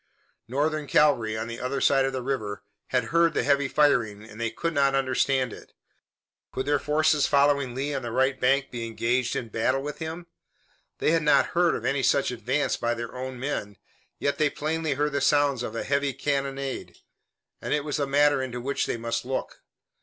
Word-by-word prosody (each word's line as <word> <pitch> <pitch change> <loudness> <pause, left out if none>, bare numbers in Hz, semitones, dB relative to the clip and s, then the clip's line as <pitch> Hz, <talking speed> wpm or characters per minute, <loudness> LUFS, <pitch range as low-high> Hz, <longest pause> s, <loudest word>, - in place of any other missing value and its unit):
Northern 150 +4 -1
cavalry, 120 -9 +3
on 110 - -3
the 115 0 -6
other 130 +2 -2
side 135 -1 +3
of 135 - -1
the 130 -1 -4
river, 110 -6 -3 0.2
had 125 -2 +1
heard 170 -1 +4
the - - +1
heavy 140 0 +2
firing 120 -8 +2
and 110 +1 -11
they 115 - 0
could 165 +9 -3
not 140 -2 +3
understand 130 -2 +1
it. - - -13 0.8
Could 130 - -3
their 145 0 +2
forces 150 0 +2
following 140 -3 +2
Lee 140 +2 -2
on 135 - -2
the 120 -2 -5
right 130 +2 +1
bank 135 +2 +2
be 115 -1 -4
engaged 120 +2 0
in 115 - -3
battle 130 +5 0
with 150 0 -6
him? 165 +2 -5 0.7
They - - +1
had 165 0 +3
not 150 0 +4
heard 175 -1 +3
of - - -5
any 140 0 +1
such 135 0 +2
advance 125 +5 -1
by 120 0 -1
their 120 0 -6
own 130 0 -5
men, 115 -7 -4 0.4
yet 140 - -1
they 155 -1 +3
plainly 155 0 -2
heard 150 +2 0
the 140 0 -1
sounds 145 -4 +3
of 115 -2 -5
a - - -2
heavy 140 0 0
cannonade, 140 -1 -3 0.6
and - - -5
it 150 -1 +1
was 150 -1 -2
a 140 - 0
matter 145 0 +3
into 125 -2 -4
which 140 +3 -1
they - - -2
must 115 0 -2
look. 130 +1 -4
135 Hz, 200 wpm, -26 LUFS, 125-145 Hz, 0.8 s, heard